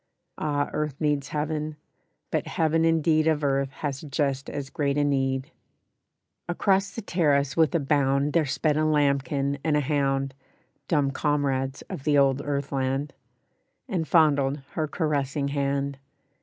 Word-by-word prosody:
Ah! 145 -1 -1
earth 150 -2 -2
needs 150 -3 0
heaven, 150 0 -2 0.6
but - - -1
heaven 160 0 +1
indeed 160 -1 +3
Of 155 -2 +1
earth 135 -1 +1
has 135 0 -4
just 140 -2 -2
as 140 -2 -5
great 140 -1 0
a 145 - +3
need." 135 -2 0 1.0
Across 195 +2 +1
the 230 - -5
terrace 145 -7 +1
with 165 +1 +3
a - - +4
bound 140 0 +1
There 165 -3 +2
sped 150 +2 +1
a 155 - +2
lambkin 140 -1 +1
and 155 -2 +2
a - - +2
hound 135 -1 0 0.5
(Dumb 145 -4 +2
comrades 135 -2 -1
of 135 - -7
the 145 -1 +3
old 135 0 +3
earth 140 -1 -2
land) 135 +1 -1 0.7
And 180 -9 -2
fondled 145 -4 +3
her 155 -2 -1
caressing 145 -3 -1
hand. 140 -1 -1
145 Hz, 145 wpm, -26 LUFS, 140-155 Hz, 1.0 s, a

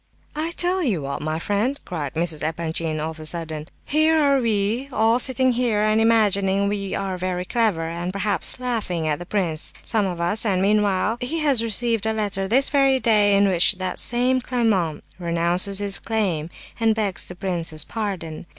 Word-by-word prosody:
"I'll 315 +2 -2
tell 360 +2 +1
you 205 - -1
what, 140 0 -4
my 155 +1 -2
friend," 205 - -1
cried 155 -6 -5
Mrs. 160 -2 -1
Epanchin, 160 0 -2
of 160 +1 -5
a 155 - -8
sudden, 160 -2 -2 0.2
"here 315 +2 +3
are 280 -3 +3
we 225 +3 0
all 225 +1 +2
sitting 260 0 +1
here 235 -3 0
and 215 +1 +2
imagining 200 -3 +2
we 200 -1 -3
are 190 -2 -3
very 180 0 -2
clever, 205 -8 0
and 170 +2 -4
perhaps 200 +5 -2
laughing 215 -10 -2
at 150 -1 -1
the 175 - -8
prince, 175 -7 0
some 215 -4 0
of 175 -2 -5
us, 175 +5 +1
and 195 -5 +1
meanwhile 205 +2 +1
he 265 +7 -2
has 275 -6 +3
received 230 -1 0
a 220 - +1
letter 200 -3 -2
this 265 +7 +2
very 275 -2 +3
day 210 -4 +3
in 200 0 +4
which 180 -2 +3
that 185 -1 -3
same 250 +2 +2
claimant 215 - 0 0.2
renounces 175 +3 +2
his 200 -1 +1
claim, 185 -9 -2 0.3
and 225 -1 +2
begs 205 -4 -2
the 180 - -7
prince's 170 -4 0
pardon. 180 -7 -5
200 Hz, 180 wpm, -22 LUFS, 170-230 Hz, 0.3 s, in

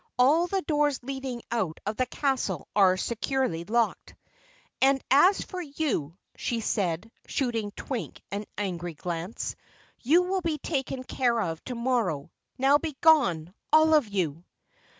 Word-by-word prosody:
All 300 +8 +4
the 385 +1 -1
doors 295 -2 +1
leading 265 -2 -5
out 190 -9 -1
of 210 +2 -2
the 255 +2 0
castle 250 - -1
are 190 -2 +5
securely 235 -5 -1
locked. 230 +2 0 0.7
And 270 +1 +5
as 355 +9 +5
for 370 -1 -6
you," 280 - -2 0.2
she 235 - -2
said, 200 -2 -1 0.2
shooting 230 -6 -1
Twink 250 -5 -5
an 205 +1 -3
angry 175 -4 -3
glance, 175 +5 -4 0.4
"you 325 +8 +4
will 375 +1 -1
be 325 -3 -1
taken 270 -4 -3
care 245 -2 +1
of 165 -6 -3
tomorrow. 235 - -1 0.3
Now 275 +2 +4
be 310 -4 -5
gone 185 - +4 0.2
all 315 0 +6
of 300 -7 +4
you!" 175 -6 -2
245 Hz, 140 wpm, -27 LUFS, 190-285 Hz, 0.7 s, all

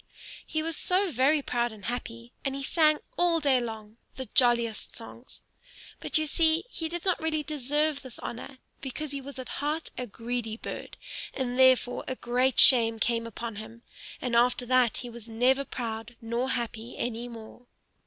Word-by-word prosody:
He 315 0 -1
was 330 -1 -1 0.3
very 280 +3 +3
proud 240 -2 0
and 210 -3 -11
happy, 235 -1 -5
and 275 -1 -2
he 275 - -4
sang 305 +1 +4 0.2
all 345 -1 +3
day 275 -4 +3
long, 220 -2 -7 0.2
the 260 - -5
jolliest 235 -4 +2
songs. 235 +2 -10 0.6
But - - +2
you 310 - +1
see 320 +2 +2
he 325 -1 -3
did 345 +2 -5
not 365 -3 +1
really 315 -1 0
deserve 295 +1 0
this 260 -5 -11
honor, 255 +3 -7 0.2
because 280 +2 -5
he 280 -1 -4
was 275 +1 -9
at 255 -1 -6
heart 305 +2 -2
a 250 - -3
greedy 230 0 -4
bird; - - -7 0.4
and 255 -1 -2
therefore 255 -1 +4
a 260 - -2
great 250 +2 +1
shame 235 -4 +8
came 230 +1 0
upon 230 -1 -6
him, 225 +2 -10 0.4
and 245 -2 -2
after 245 +1 +3
that 250 -2 +3
he 245 - -6
was 230 -1 -11
never 255 +5 +2
proud 230 -2 -5
nor 235 +2 -2
happy 235 -1 -3
any 240 0 -3
more. 235 +1 -11
250 Hz, 175 wpm, -28 LUFS, 235-280 Hz, 0.6 s, shame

